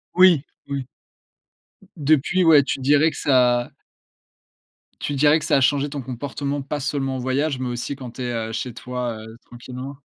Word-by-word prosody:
Oui, 180 -6 +6 0.2
oui. 140 -2 -3 1.1
Depuis, 155 +4 +2
ouais, 155 -4 +7
tu 135 - -3
dirais 145 +4 +3
que - - -10
ça 125 -3 +2 1.3
tu 145 - -3
dirais 150 +3 +4
que - - -6
ça - - +2
a 135 - +3
changé 140 +2 +2
ton 140 -1 -5
comportement, 140 +3 -4
pas 145 +1 -4
seulement 135 -1 -2
en - - -3
voyage, 135 +3 0
mais 130 -1 -3
aussi 120 +3 -4
quand 130 -3 -9
tu 130 - -9
es, 120 -1 -2
heu, 115 -1 -3
chez 125 +1 -4
toi, 125 -1 -4
heu, 110 +1 -11
tranquillement? 130 +3 -9
135 Hz, 180 wpm, -22 LUFS, 125-145 Hz, 1.3 s, ouais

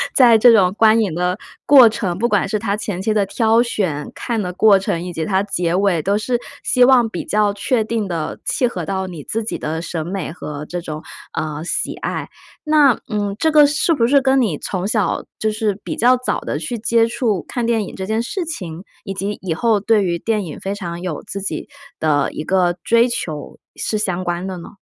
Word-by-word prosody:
在 240 -4 +7
这 240 +2 +7
种 195 -5 +5
观 225 0 +5
影 195 -7 0
的 180 +2 0 0.3
过 265 -5 +8
程， 195 -5 -2
不 235 +5 +1
管 205 -3 +2
是 215 +1 -1
它 205 -1 -1
前 205 -3 -4
期 215 +2 0
的 210 -2 +2
挑 225 +3 +2
选、 185 -11 -2
看 235 -2 -3
的 180 -2 -3
过 205 +2 +5
程， 190 -3 -2
以 180 - -5
及 160 -1 -3
它 190 -1 +1
结 175 -4 -1
尾 185 -3 +2
都 200 +2 +1
是 240 +3 0 0.3
希 250 - +3
望 250 -2 +5
比 175 - -5
较 210 0 +2
确 220 +3 0
定 220 -1 -2
地 165 -4 -3
契 250 - +1
合 180 -8 -5
到 190 +2 -2
你 165 -6 -8
自 225 +1 -3
己 220 - -3
的 160 +1 -3
审 165 -2 -4
美 185 -2 -4
和 150 -3 -7
这 175 +2 -5
种， 155 -2 -6 0.3
呃， 155 0 -3
喜 175 - -2
爱。 - - -4 0.3
那， 300 -5 +4
嗯， 205 -1 -2
这 320 - +3
个 300 -1 +7
是 290 +4 +2
不 245 -7 +2
是 275 +3 +4
跟 265 0 +3
你 195 -11 0
从 185 0 -3
小 215 -2 0 0.2
就 220 - 0
是 215 -2 -1
比 - - -4
较 250 +3 +4
早 255 - -2
地 145 - -3
去 200 +10 -4
接 230 +1 +2
触 230 -6 -1
看 240 -2 -2
电 225 -3 +1
影 - - -9
这 190 - -5
件 220 +3 0
事 360 - -3
情， 180 - -6 0.2
以 195 - -5
及 200 +2 -3
以 180 -4 -2
后 220 +3 +2
对 210 0 +2
于 170 -2 -1
电 215 -1 -1
影 155 - -8
非 195 +1 -4
常 175 -4 -6
有 175 -5 -4
自 200 - -5
己 195 - -4 0.3
的 145 -3 +1
一 - - -4
个 180 0 +1
追 235 +1 +4
求 160 -11 -5 0.2
是 215 - -2
相 185 -3 -1
关 175 +1 -2
的 190 -1 -5
呢？ 175 +3 -11
205 Hz, 240 characters per minute, -19 LUFS, 175-230 Hz, 0.3 s, 过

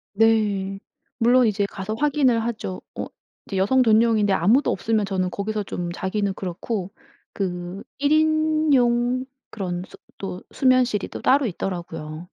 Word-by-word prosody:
네. 205 -3 +2 0.4
물론 245 0 +4
이제 205 -1 +1
가서 200 +2 -5
확인을 265 -5 +2
하죠. 220 -5 -4
어 - - -3 0.4
이제 195 - -3
여성 255 +8 +3
전용인데 220 -3 +4
아무도 220 - +3
없으면 215 +2 0
저는 185 -2 -1
거기서 210 +2 -2
좀 175 -2 -4
자기는 195 +2 -2
그렇고 190 +1 -4 0.4
그 180 0 -4
1 285 +1 +1
인용 300 -6 +2 0.3
그런 180 -4 -4
수 - - -15 0.2
또 185 -2 -5
수면실이 255 -5 +2
또 - - -7
따로 270 -1 +3
있더라고요. 165 -4 -5
215 Hz, 280 characters per minute, -23 LUFS, 190-250 Hz, 0.4 s, 물론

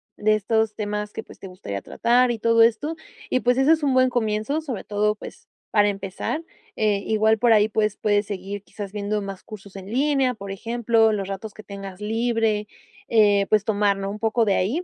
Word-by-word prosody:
de 215 +1 +2
estos 220 +1 0
temas 210 0 -3
que 220 - -6
pues, - - -15
te 195 - -9
gustaría 100 - -6
tratar 245 +2 +2
y 240 - -1
todo 230 +1 +3
esto 235 +8 +2 0.4
y 255 - +3
pues 245 0 +2
ese 270 +4 +4
es 320 -1 +3
un 275 -3 +1
buen 255 0 +4
comienzo 225 +5 -1
sobre 265 -10 -5
todo, 210 0 0
pues, - - -12 0.2
para 205 -1 +4
empezar, 195 - -4 0.3
eh, 210 -2 +1
igual 220 0 +3
por 240 0 +4
ahí 215 -1 +5
pues 210 -1 0
puedes 205 -1 +1
seguir 200 0 -5
quizás 205 -1 -8
viendo 210 0 -2
más 195 -1 -7
cursos 200 -2 -11
en 190 -1 -8
línea, 270 0 +1
por 200 -2 -8
ejemplo, 230 +2 +2
los 200 -2 -2
ratos 200 +2 -6
que 215 - -11
tengas 195 -2 -9
libre, 225 -1 0 0.4
eh, 205 -3 +4
pues 215 -1 +3
tomar 205 -2 +2
¿no? 195 0 -3
Un 210 - -7
poco 225 +1 +1
de 200 - +2
ahí 240 - 0
215 Hz, 205 wpm, -23 LUFS, 200-230 Hz, 0.4 s, ahí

